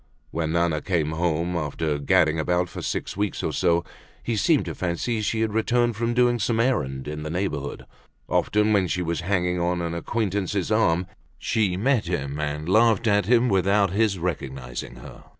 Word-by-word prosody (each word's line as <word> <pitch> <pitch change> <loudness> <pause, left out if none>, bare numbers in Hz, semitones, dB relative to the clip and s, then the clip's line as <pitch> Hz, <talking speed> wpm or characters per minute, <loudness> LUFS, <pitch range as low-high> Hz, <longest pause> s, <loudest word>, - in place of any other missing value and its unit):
When 80 -1 -2
Nana 85 -3 +1
came 80 -4 0
home 85 +1 -1
after 75 -1 -2
gadding 80 +3 +3
about 90 +2 0
for - - -7
six - - -3
weeks 100 +1 -2
or - - -1
so 85 0 +2 0.4
he 115 - -1
seemed 140 - +2
to - - -4
fancy 95 +6 -2
she 110 +1 -1
had 110 -2 0
returned 120 +1 +1
from 115 +2 -1
doing 120 -1 +3
some 110 +2 0
errand 70 - 0
in 75 0 -5
the 75 - -5
neighborhood. 80 -5 -3 0.4
Often 105 +1 +2
when 95 -3 +3
she 90 +1 -1
was 85 -2 -2
hanging 90 -1 0
on 85 +1 0
an 85 -1 -3
acquaintance's 100 +1 -2
arm 95 -5 +2 0.3
she 100 -5 0
met 120 +1 +1
him 70 -4 -3
and 75 +1 -3
laughed 115 +4 +4
at 105 -3 +2
him 120 +1 +4
without 100 -1 +2
his 105 0 +1
recognizing 70 -8 -5
her. - - -12
90 Hz, 180 wpm, -24 LUFS, 80-110 Hz, 0.4 s, laughed